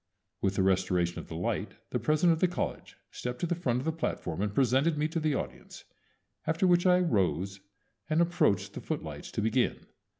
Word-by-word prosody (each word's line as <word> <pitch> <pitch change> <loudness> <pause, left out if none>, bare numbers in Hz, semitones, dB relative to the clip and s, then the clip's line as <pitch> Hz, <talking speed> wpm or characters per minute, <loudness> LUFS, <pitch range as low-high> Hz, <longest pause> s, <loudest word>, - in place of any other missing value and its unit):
With 95 0 +1
the 95 - +2
restoration 90 -2 +1
of - - -9
the - - -7
light - - -2 0.2
the - - 0
president 155 +3 +3
of 160 - -2
the 185 - +4
college 180 - -4
stepped 125 0 -4
to - - +2
the 175 - 0
front 135 -9 0
of 130 - -3
the 160 - +1
platform 95 - -3
and 105 0 0
presented 135 +7 +2
me 150 +1 +1
to 165 - -1
the 155 -2 +1
audience, 65 - -6 0.6
after 165 +4 +2
which 175 0 +4
I 180 0 +6
rose 95 - 0 0.5
and 155 +1 +2
approached 170 - +2
the - - -6
footlights - - -5
to 105 - -1
begin. 120 +3 +1
135 Hz, 200 wpm, -30 LUFS, -, 0.6 s, I